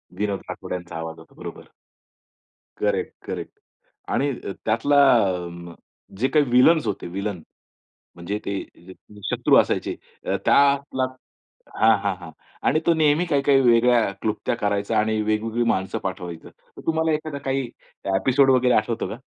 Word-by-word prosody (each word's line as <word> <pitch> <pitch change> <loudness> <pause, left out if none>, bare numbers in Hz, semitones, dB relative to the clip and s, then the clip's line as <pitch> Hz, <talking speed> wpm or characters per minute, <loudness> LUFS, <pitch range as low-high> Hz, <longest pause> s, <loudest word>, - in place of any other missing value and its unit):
विनोद 100 -2 -1
राठोड - - -6
यांचा 90 -2 -6
आवाज 80 0 -6
होता. - - -18
बरोबर. - - -9 1.1
Correct, - - -1
correct. - - -5 0.6
आणि 140 +1 +1
अ, 120 - -6
त्यातला 115 +6 +2 0.2
आ, 85 -5 -1 0.4
जे 130 +5 +2
काही 150 -1 +3
व्हिलन्स 135 +5 +5
होते, 100 - -3
व्हीलन. 100 0 -4 0.7
म्हणजे 85 +4 -4
ते 100 - -2 0.8
शत्रू - - +3
असायचे. - - +1 0.3
अ, - - 0
त्यातला 140 -2 +3 0.8
हां, 110 0 +5
हां, 100 -2 0
हां. 85 -2 -10 0.4
आणि 155 - +3
तो 170 - +5
नेहमी 155 +2 +3
काही-काही 140 -3 +3
वेगळ्या 120 -2 +4
क्लुप्त्या 110 +2 -1
करायचा 100 -2 0
आणि 110 0 +1
वेगवेगळी 110 +2 0
माणसं 95 0 -1
पाठवायचं. 90 -3 -6
तर - - -17
तुम्हाला 160 0 +1
एखादा 155 -1 -3
काही 135 -1 0 0.5
एपिसोड 135 +6 +3
वगैरे 125 -1 +4
आठवतो 110 +2 0
का? 110 - -6
115 Hz, 140 wpm, -23 LUFS, 100-140 Hz, 1.1 s, व्हिलन्स